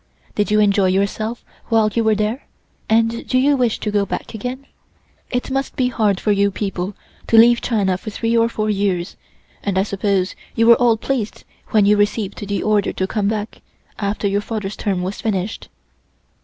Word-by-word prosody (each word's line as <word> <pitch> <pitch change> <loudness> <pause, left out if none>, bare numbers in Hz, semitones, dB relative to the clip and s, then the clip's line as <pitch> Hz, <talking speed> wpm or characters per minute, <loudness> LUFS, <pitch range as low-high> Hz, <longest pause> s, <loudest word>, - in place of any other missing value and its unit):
Did 205 - 0
you 210 0 +3
enjoy 200 -2 +3
yourself 200 +4 -1 0.2
while 220 -2 +3
you 230 - +1
were 220 -1 +3
there, 215 +6 -2 0.4
and 225 +1 +2
do 255 - +1
you 280 +3 +4
wish 245 -4 +1
to 210 - -2
go 205 -1 +2
back - - -5
again? 250 +5 -5 0.6
It 250 +1 -2
must 270 0 -2
be 250 -1 +1
hard 210 -5 +1
for 210 - +1
you 200 0 +3
people 195 -1 -4 0.3
to 225 - +4
leave 235 +1 +7
China 195 -6 0
for 215 - -7
three 230 +2 -1
or 230 0 +3
four 215 -2 -2
years, 195 -3 -1 0.5
and 200 -2 -1
I 190 - +3
suppose 200 -2 0 0.2
you 230 - +3
were 235 0 +8
all 235 -2 +4
pleased 230 -2 -3 0.2
when 210 -2 +3
you 210 +1 +4
received 205 0 0
the 200 0 -2
order 210 -2 +2
to 190 - -2
come 200 +1 -1
back, 215 0 -3 0.4
after 200 0 -1
your 200 +1 0
father's 210 -2 -4
term 190 -3 -2
was 190 +3 -4
finished." 205 -1 -2
210 Hz, 190 wpm, -20 LUFS, 200-230 Hz, 0.6 s, were